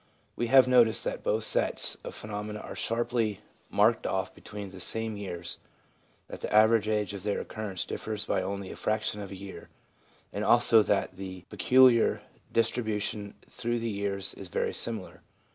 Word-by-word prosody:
We 120 - -1
have 130 +1 +7
noticed 120 -3 +4
that - - -3
both 110 +1 0
sets - - +4
of - - -7
phenomena 105 0 -5
are - - -8
sharply 115 -3 -1 0.3
marked 110 +2 +3
off 95 -1 -2
between 105 -2 -8
the 95 - -11
same 110 +4 -2
years, 90 -4 -5 0.7
that - - -9
the - - -4
average 110 0 +5
age 105 -2 0
of 100 - -6
their 105 +1 -1
occurrence 105 -5 -5
differs 110 -1 -4
by - - 0
only 100 +1 -4
a - - -8
fraction 110 -1 -2
of 100 - -7
a - - -6
year, 95 0 -10 0.6
and - - -2
also 115 - +6
that 100 -3 0
the 95 -1 -7
peculiar 120 +4 +4 0.3
dis 115 - +2
tribution 105 -3 -3
through 120 0 -2
the 115 -1 -2
years 100 -1 -3
is 95 - -9
very - - -1
similar. 110 -5 -4
105 Hz, 170 wpm, -29 LUFS, 100-115 Hz, 0.7 s, have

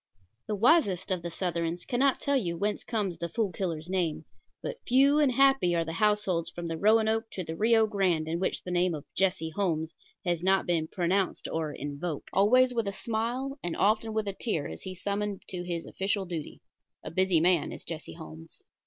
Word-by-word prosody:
The 210 - -1
wisest 205 - +3
of 185 -2 0
the 170 - -4
Southrons 170 -1 -2
cannot 265 +2 +2
tell 280 - 0
you 175 -10 0
whence 205 +4 -1
comes 205 -7 -2
the 170 - -3
Fool 220 -2 -1
Killer's 165 -3 -3
name; 180 -4 -1 0.4
but - - -4
few 275 +4 +5
and 290 -3 +4
happy 270 -9 +4
are 165 -1 +1
the 160 - -4
households 195 -4 +1
from 170 0 -6
the 165 - -2
Roanoke 220 +1 +3
to 185 - -3
the 160 -1 -5
Rio 225 +3 +4
Grande 185 -7 +1
in 165 +1 -1
which 185 - -1
the 180 - -5
name 180 -1 +2
of 145 - -8
Jesse 180 -4 +1
Holmes 160 -3 -1 0.3
has 175 -2 0
not 190 +1 +3
been 165 -3 0
pronounced 185 +2 0
or 160 -2 -2
invoked. 145 +2 -5
Always 250 +6 +5
with 230 -3 -1
a - - 0
smile, 240 +7 -3
and 175 - -3
often 215 +2 +2
with 215 -1 -1
a 200 - -1
tear, 190 -8 -2
is 80 - -8
he 185 - -6
summoned 200 +1 -3
to 180 -1 -4
his 175 -2 -3
official 195 0 -1
duty. 170 -4 -6 0.4
A - - -6
busy 185 0 +3
man 175 0 +2
is - - -8
Jesse 155 - -6
Holmes. 80 +1 -10
185 Hz, 200 wpm, -29 LUFS, 170-220 Hz, 0.4 s, few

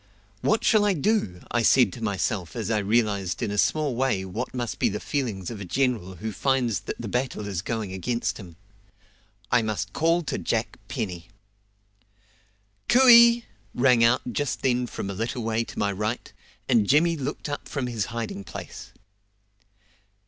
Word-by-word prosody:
"What 220 - +1
shall 215 -2 +4
I 205 -1 +3
do?" 150 - 0
I 120 - +2
said 125 +2 +4
to 120 - -8
myself 100 -2 -2
as 115 -1 -3
I 105 - +2
realised 100 -4 0
in 100 - -1
a 105 - -3
small 150 -1 +1
way 120 -7 0
what 110 +7 -4
must 120 -3 -4
be - - +3
the 105 - -3
feelings 115 - -3
of 105 -3 -7
a - - -4
general 110 -3 -1
who 110 +6 -5
finds 125 -4 0
that 105 - -7
the 120 - -5
battle 125 -1 -2
is 95 -4 -3
going 110 -2 -3
against 115 +5 -2
him. 90 -5 -11 1.0
"I 125 - +4
must 105 -3 -3
call 165 +5 +2
to 135 - -3
Jack - - -2
Penny." 90 -5 -4 1.6
"Cooey!" 235 -2 +7 0.3
rang 125 -2 +4
out 120 +1 +2
just 145 0 -2
then 125 -1 +1
from 100 - -5
a 100 - -4
little 115 +4 -3
way 115 +1 0
to - - -11
my 100 -1 +1
right, 105 +4 -3 0.3
and 115 -5 +3
Jimmy 165 +4 +4
looked 145 0 -4
up 145 -1 -5
from 140 -3 -2
his 115 -5 -2
hiding 115 -3 -5
place. - - -9
115 Hz, 170 wpm, -25 LUFS, 100-135 Hz, 1.6 s, Cooey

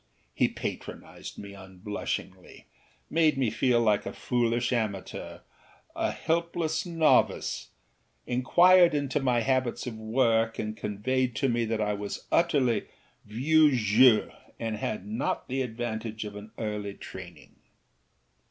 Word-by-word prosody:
He - - +2
patronised - - -7
me 100 -1 -9
unblushingly, 95 +1 -6 0.4
made 155 -3 +2
me 125 -5 +1
feel 125 -2 +2
like 105 -3 +2
a - - -5
foolish 120 0 0
amateur, 105 -5 -4 0.5
a - - 0
helpless 170 0 -1
novice, 165 -2 +2 0.6
inquired 175 +7 +5
into 145 0 0
my 125 -3 +1
habits 130 0 0
of 115 -3 -6
work 115 0 +1
and 110 0 -3
conveyed 125 +5 -1
to 135 +3 +1
me 120 -1 +1
that 110 -1 -1
I 105 0 0
was 100 0 -5
utterly 135 -10 +2 0.4
vieux 145 +7 +3
jeu 110 +2 +5 0.3
and 110 -2 -3
had 105 -2 -4
not 110 +5 -2
had - - -32
the 135 +1 -1
advantage 110 -2 -4
of 105 -1 -7
an 105 +1 -9
early 105 -2 -4
training. 90 -2 -11
115 Hz, 130 wpm, -28 LUFS, 105-135 Hz, 0.6 s, inquired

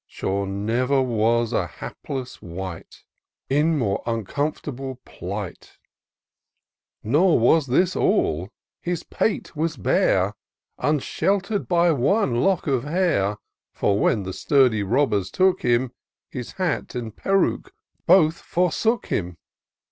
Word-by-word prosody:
Sure 100 +1 -2
never 115 +8 0
was 115 -1 +1
an 90 -6 0
hapless 130 - -7
wight 90 0 -8 0.5
In 150 +3 +3
more 105 -7 0
uncomfortable 130 +4 -3
plight: 95 +1 -7 1.3
Nor 155 - +4
was 140 +6 +3
this 175 +9 +2
aU; 90 - +1 0.3
his 175 -1 -3
pate 215 - -2
was 155 0 -1
bare, 100 - +2 0.5
Unshelter*d 195 - 0
by 175 -1 +3
one 140 - +1
lock 195 -1 +1
of 130 -4 0
hair; 145 - +1 0.4
For 100 0 +1
when 105 -2 +2
the 95 0 -5
sturdy 130 - +3
robbers 105 -3 +1
took 185 - +2
him, 120 +1 +1 0.4
His 125 -2 -6
hat 185 -7 -2
and 115 -3 -5
peruke 195 - 0 0.4
both 170 -2 +5
forsook 180 +7 0
him. 90 -2 -3
130 Hz, 115 wpm, -23 LUFS, 105-170 Hz, 1.3 s, both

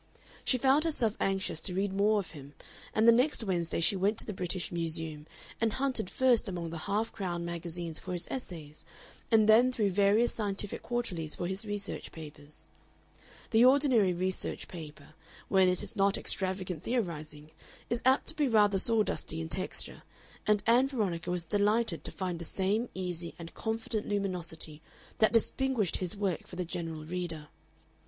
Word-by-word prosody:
She 255 - +3
found 270 +4 +4
herself 245 -10 0
anxious 195 -4 0
to 180 0 -2
read 195 0 0
more 210 +2 +3
of 195 -4 -3
him, 145 -2 -11 0.4
and 220 +1 +3
the - - +10
next 250 +2 +3
Wednesday 175 -6 -1
she 165 +4 +4
went 200 +3 +1
to - - 0
the 210 - -4
British 185 -1 -2
Museum 160 -2 -3 0.3
and 225 -2 +2
hunted 260 -8 0
first 245 -4 +3
among 170 -3 -4
the 165 - -5
half 215 +3 0
crown 175 -4 -3
magazines 170 -1 -4
for 185 - -6
his 175 0 -2
essays 160 - -7 0.5
and 220 -1 +5
then 235 +4 +6
through 210 -5 +1
various 205 +5 +3
scientific 205 -2 -2
quarterlies 185 -11 -3
for 175 - -3
his 190 +4 -3
research 205 -1 -5
papers. 150 -2 -10 0.8
The 225 +1 +5
ordinary 255 -7 +5
research 185 +1 -2
paper, 155 -3 -10 0.4
when 190 -1 +5
it 180 - 0
is - - -5
not 200 -1 +3
extravagant 185 -3 -1
theorizing, 155 -10 -3 0.4
is 235 +1 -1
apt 260 +2 +4
to 320 - -5
be 300 -3 +2
rather 205 -4 +4
sawdusty 215 -6 +2
in 160 0 -4
texture, 185 +2 -1 0.5
and 210 -1 +3
Ann 245 +4 +5
Veronica 190 -10 -2
was 175 -1 -1
delighted 205 0 +1
to - - -1
find 180 -3 -3
the - - -5
same 200 +7 0
easy 175 -2 -4
and 165 -1 -9
confident 220 -1 -3
luminosity 175 -6 -3 0.4
that 220 - +5
distinguished 230 -3 +1
his 185 +2 -2
work 195 -4 -2
for - - -10
the 180 0 -2
general 165 -2 -5
reader. 165 -3 -5
190 Hz, 170 wpm, -31 LUFS, 170-220 Hz, 0.8 s, the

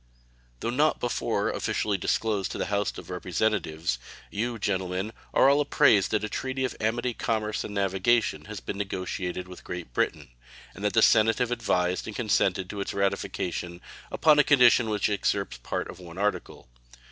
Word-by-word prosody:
Though 115 - -1
not 150 +5 +2
before 120 - -1
officially 105 -1 -1
disclosed 100 +1 0
to - - -5
the - - -1
House 100 0 0
of - - -9
Representatives, 90 - -1 0.3
you, 115 +3 -2
gentlemen, 95 0 -2 0.2
are - - +5
all 140 +2 +5
apprised 140 -9 +4
that 110 -1 0
a - - -1
treaty 130 +4 -2
of 125 - -4
amity, 120 +3 0
commerce, 110 -2 -1
and 105 - -7
navigation 100 +4 +1
has 105 -2 -7
been 100 - -6
negotiated 90 -2 -3
with 90 0 -11
Great 90 -8 -7
Britain, - - -1 0.4
and 100 - -10
that 105 - +1
the 115 - +4
Senate 110 +1 +5
have 125 -1 0
advised 90 -6 0
and 110 - -6
consented 95 -5 +1
to 100 - -4
its - - -4
ratification 90 -3 -2 0.3
upon 155 -2 +4
a - - +7
condition 125 -5 +5
which 105 -1 +1
excepts 100 - -1
part - - -3
of - - -10
one 85 -1 -11
article. 105 -8 -2
105 Hz, 170 wpm, -27 LUFS, 95-115 Hz, 0.4 s, a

